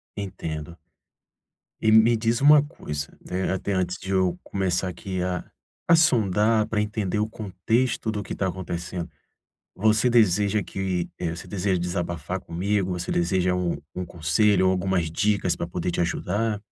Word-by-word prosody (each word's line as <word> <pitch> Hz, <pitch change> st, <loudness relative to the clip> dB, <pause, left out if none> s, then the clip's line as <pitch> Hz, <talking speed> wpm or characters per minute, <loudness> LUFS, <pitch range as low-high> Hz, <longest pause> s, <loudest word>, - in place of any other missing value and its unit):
Entendo. 85 Hz, -5 st, -5 dB, 1.0 s
E 110 Hz, -1 st, +4 dB
me 115 Hz, +1 st, +6 dB
diz 115 Hz, +2 st, 0 dB
uma 145 Hz, +1 st, +8 dB
coisa, 75 Hz, -, -5 dB, 0.2 s
né, 95 Hz, +1 st, -1 dB
até 95 Hz, +2 st, -3 dB
antes 95 Hz, 0 st, -1 dB
de 95 Hz, -, -9 dB
eu 95 Hz, -2 st, +2 dB
começar 95 Hz, -1 st, -1 dB
aqui 90 Hz, +1 st, -4 dB
a 90 Hz, -1 st, -2 dB, 0.5 s
a -, -, +9 dB
sondar 110 Hz, -, +3 dB
pra 110 Hz, -1 st, -1 dB
entender 105 Hz, -1 st, -1 dB
o 105 Hz, +1 st, +1 dB
contexto 110 Hz, +3 st, -1 dB
do 105 Hz, -1 st, -3 dB
que -, -, -6 dB
tá 95 Hz, -, -1 dB
acontecendo. 90 Hz, -1 st, -4 dB, 0.7 s
Você 110 Hz, +4 st, +3 dB
deseja 105 Hz, -3 st, +3 dB
que, 95 Hz, -3 st, -3 dB
eh, 85 Hz, -1 st, -2 dB
você 85 Hz, -, -9 dB
deseja 95 Hz, -2 st, 0 dB
desabafar 85 Hz, -2 st, -3 dB
comigo, 95 Hz, +2 st, -1 dB
você 90 Hz, -1 st, -4 dB
deseja 90 Hz, +1 st, +1 dB
um 90 Hz, -3 st, -1 dB, 0.2 s
um 90 Hz, -, -3 dB
conselho 95 Hz, +5 st, +2 dB
ou 95 Hz, -, +4 dB
algumas 90 Hz, -3 st, 0 dB
dicas 100 Hz, 0 st, +1 dB
pra -, -, -3 dB
poder 90 Hz, +1 st, -3 dB
te -, -, -2 dB
ajudar? 100 Hz, +5 st, -1 dB
95 Hz, 160 wpm, -25 LUFS, 90-105 Hz, 1.0 s, a